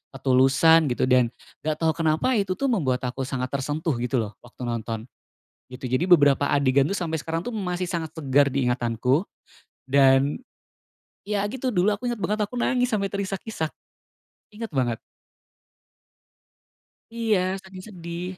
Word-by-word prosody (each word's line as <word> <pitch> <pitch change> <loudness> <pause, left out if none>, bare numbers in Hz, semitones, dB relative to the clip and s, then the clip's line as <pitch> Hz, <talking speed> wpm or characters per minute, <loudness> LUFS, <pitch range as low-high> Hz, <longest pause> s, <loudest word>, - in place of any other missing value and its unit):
ketulusan, 135 +5 +4
gitu. 120 - -1
Dan, 125 -1 +4 0.3
nggak 155 0 -1
tau 160 +1 +1
kenapa 160 +8 +1
itu 190 -2 -1
tuh 275 +2 0
membuat 130 - 0
aku 125 +1 -3
sangat 130 -1 -3
tersentuh 145 +4 -2
gitu 125 -1 0
loh, 105 - -6
waktu 125 +1 -12
nonton, 115 -2 -3 0.6
gitu. 125 +1 -12
Jadi, 155 +8 +1
beberapa 145 -5 +5
adegan 140 0 +3
tuh 200 - -2
sampai 165 -4 -2
sekarang 165 +2 -3
tuh 245 - -4
masih 180 -4 -3
sangat 160 -3 -4
segar 140 -2 +3
di 140 0 0
ingatanku, 125 - 0 0.6
dan 135 +1 +4 0.9
ya, 205 0 -1
gitu, 260 +4 -3
dulu 205 0 +2
aku 240 +4 -3
inget 240 - -3
banget 210 +1 -1
aku 225 +4 -3
nangis 250 0 +1
sampai 205 -3 0
terisak-isak, 195 -3 -3 0.8
inget 225 +1 -6
banget. 125 -6 -1 2.1
Iya, 225 -4 +1 0.2
saking 190 -1 -11
sedih. 170 -3 -7
160 Hz, 145 wpm, -25 LUFS, 130-195 Hz, 2.1 s, beberapa